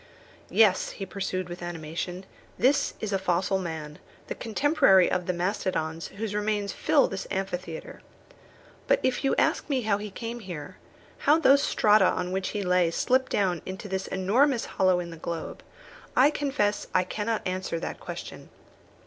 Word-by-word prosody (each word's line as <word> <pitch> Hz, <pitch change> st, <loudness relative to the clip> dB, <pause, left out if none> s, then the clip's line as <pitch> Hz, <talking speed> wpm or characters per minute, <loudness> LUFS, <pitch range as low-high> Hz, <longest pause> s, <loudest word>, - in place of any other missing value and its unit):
"Yes," 210 Hz, -5 st, +3 dB
he 195 Hz, -, -6 dB
pursued 185 Hz, -1 st, -3 dB
with 175 Hz, 0 st, -8 dB
animation, 175 Hz, +2 st, -5 dB, 0.3 s
"this 275 Hz, +3 st, +2 dB
is 210 Hz, -2 st, -3 dB
a 195 Hz, -, +1 dB
fossil 185 Hz, +1 st, +1 dB
man, 160 Hz, -4 st, -6 dB, 0.3 s
the -, -, -1 dB
contemporary 230 Hz, -, +3 dB
of 180 Hz, -1 st, -1 dB
the -, -, +2 dB
mastodons 175 Hz, -3 st, -2 dB
whose 215 Hz, -1 st, -3 dB
remains 210 Hz, -1 st, -1 dB
fill -, -, +3 dB
this 195 Hz, 0 st, -5 dB
amphitheatre. 185 Hz, -4 st, -5 dB, 0.9 s
But -, -, +4 dB
if 260 Hz, +2 st, 0 dB
you 270 Hz, -, +2 dB
ask -, -, +1 dB
me 265 Hz, -4 st, 0 dB
how 205 Hz, -2 st, +1 dB
he 210 Hz, 0 st, -5 dB
came 230 Hz, +4 st, -6 dB
there, 150 Hz, -5 st, -7 dB, 0.4 s
how 300 Hz, +2 st, +4 dB
those 280 Hz, -3 st, +5 dB
strata 210 Hz, -6 st, +4 dB
on 180 Hz, 0 st, -2 dB
which 190 Hz, 0 st, -1 dB
he 205 Hz, -1 st, -3 dB
lay 180 Hz, -2 st, +3 dB
slipped 255 Hz, +9 st, +1 dB
down 180 Hz, -5 st, +1 dB
into 190 Hz, +2 st, -7 dB
this 190 Hz, -1 st, -3 dB
enormous 235 Hz, +7 st, +2 dB
hollow 185 Hz, -1 st, +2 dB
in 170 Hz, -1 st, -5 dB
the 165 Hz, -, -9 dB
globe, 165 Hz, 0 st, -5 dB, 0.5 s
I 275 Hz, +4 st, +6 dB
confess 270 Hz, -9 st, -1 dB
I 185 Hz, -, +5 dB
cannot 210 Hz, +4 st, -3 dB
answer 185 Hz, -2 st, -2 dB
that -, -, -5 dB
question. -, -, -8 dB
190 Hz, 165 wpm, -27 LUFS, 180-220 Hz, 0.9 s, I